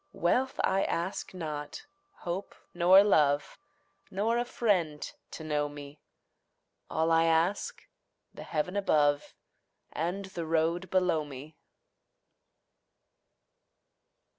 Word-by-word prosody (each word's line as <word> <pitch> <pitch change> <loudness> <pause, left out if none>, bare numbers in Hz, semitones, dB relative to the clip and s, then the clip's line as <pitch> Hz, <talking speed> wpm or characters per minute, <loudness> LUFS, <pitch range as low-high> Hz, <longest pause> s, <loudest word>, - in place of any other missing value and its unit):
Wealth 255 +10 0
I 195 +1 +2
ask 175 +4 -3
not, 150 - -6 0.4
hope 180 +3 -4 0.2
nor 185 +3 +7
love, 150 -7 +2 0.5
Nor 225 +5 0
a 240 - 0
friend 180 -12 0 0.3
to 160 - -8
know 150 -1 -1
me; 145 0 -10 0.9
All 160 +1 +1
I 165 0 +4
ask, 165 +4 0 0.5
the - - -10
heaven 165 +4 -2
above 145 -7 +2 0.6
And 180 +5 -3
the 170 -2 -4
road 165 +3 0
below 180 -4 +2
me. 145 +2 -10
165 Hz, 100 wpm, -30 LUFS, 150-190 Hz, 0.9 s, nor